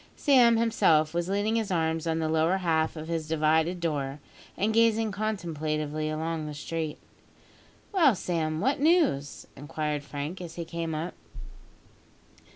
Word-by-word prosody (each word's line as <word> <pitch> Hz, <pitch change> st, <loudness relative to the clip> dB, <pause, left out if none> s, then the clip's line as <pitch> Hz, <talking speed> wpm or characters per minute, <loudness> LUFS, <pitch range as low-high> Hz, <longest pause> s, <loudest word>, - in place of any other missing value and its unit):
Sam 245 Hz, -5 st, +5 dB
himself 175 Hz, -9 st, +3 dB
was 175 Hz, +1 st, -1 dB
leaning 205 Hz, +3 st, +1 dB
his 220 Hz, -3 st, -1 dB
arms 160 Hz, -2 st, 0 dB
on 160 Hz, 0 st, 0 dB
the 160 Hz, -1 st, -1 dB
lower 160 Hz, +4 st, +2 dB
half 160 Hz, -3 st, 0 dB
of 155 Hz, 0 st, -7 dB
his 165 Hz, -2 st, -3 dB
divided 160 Hz, +2 st, +1 dB
door, 145 Hz, -4 st, -2 dB, 0.4 s
and 215 Hz, +3 st, +1 dB
gazing 225 Hz, -1 st, +3 dB
contemplatively 155 Hz, -7 st, -2 dB
along 160 Hz, 0 st, -3 dB
the 150 Hz, -, -6 dB
street. 155 Hz, +1 st, -4 dB, 0.9 s
"Well, 325 Hz, -, +4 dB
Sam, 160 Hz, -3 st, -2 dB
what 270 Hz, +2 st, +1 dB
news?" 290 Hz, -, +2 dB
inquired 150 Hz, +1 st, -3 dB
Frank 145 Hz, +5 st, -6 dB
as 170 Hz, -2 st, -8 dB
he 170 Hz, -, -5 dB
came 165 Hz, -1 st, -4 dB
up. 165 Hz, +3 st, -4 dB
165 Hz, 145 wpm, -28 LUFS, 155-200 Hz, 0.9 s, Sam